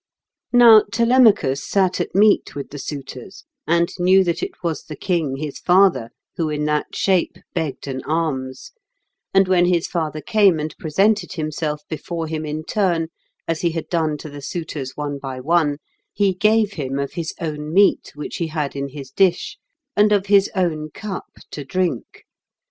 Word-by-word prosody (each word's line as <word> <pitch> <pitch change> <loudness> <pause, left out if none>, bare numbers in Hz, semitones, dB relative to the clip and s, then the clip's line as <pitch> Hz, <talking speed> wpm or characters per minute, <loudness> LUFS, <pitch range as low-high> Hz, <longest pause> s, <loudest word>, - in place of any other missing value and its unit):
] - - -68
Now 235 -3 +8
Telemachus 230 - +3
sat 190 -2 +1
at - - -5
meat 205 +1 +3
with 140 - -6
the 145 - -7
suitors, 135 - -8 0.2
and 170 0 +3
knew 185 +2 +5
that 170 -2 -1
it 375 - -6
was 165 -2 -2
the 155 - -8
king 165 -8 -1
his 150 0 -5
father 180 -11 +3 0.3
who 160 -2 0
in 150 0 -2
that 150 0 -1
shape 190 -3 +1 0.2
begged 160 -5 -3
an 130 -1 -4
alms; 135 -5 -3 0.6
and 195 -1 +4
when 180 -1 +4
his 175 -2 +2
father 155 -3 -3
came 200 -3 +3
and 155 0 -4
presented 195 +7 +1
himself 155 -2 -3
before 165 +2 -4
him 155 -1 -4
in 155 +1 -4
turn, 170 -3 0 0.4
as 165 -1 -2
he 170 -2 0
had 165 - -5
done 160 -3 0
to 155 - -9
the 145 0 -9
suitors 145 -3 -5
one 145 -1 -4
by 135 -2 -6
one, 150 +1 +1 0.3
he 200 -2 +1
gave 215 +2 +2
him 135 -3 -4
of 140 0 -3
his 165 -2 -4
own 150 -3 -4
meat 200 +4 +3
which 150 - -6
he 170 - -2
had 150 -3 -3
in 140 0 -3
his 135 -1 -9
dish, 185 +3 +1 0.4
and 210 0 +4
of 200 -2 +2
his 200 -1 +4
own 160 -5 -1
cup 195 +4 -6 0.2
to 145 - -6
drink. 175 -3 -3
165 Hz, 175 wpm, -21 LUFS, 150-190 Hz, 0.6 s, Now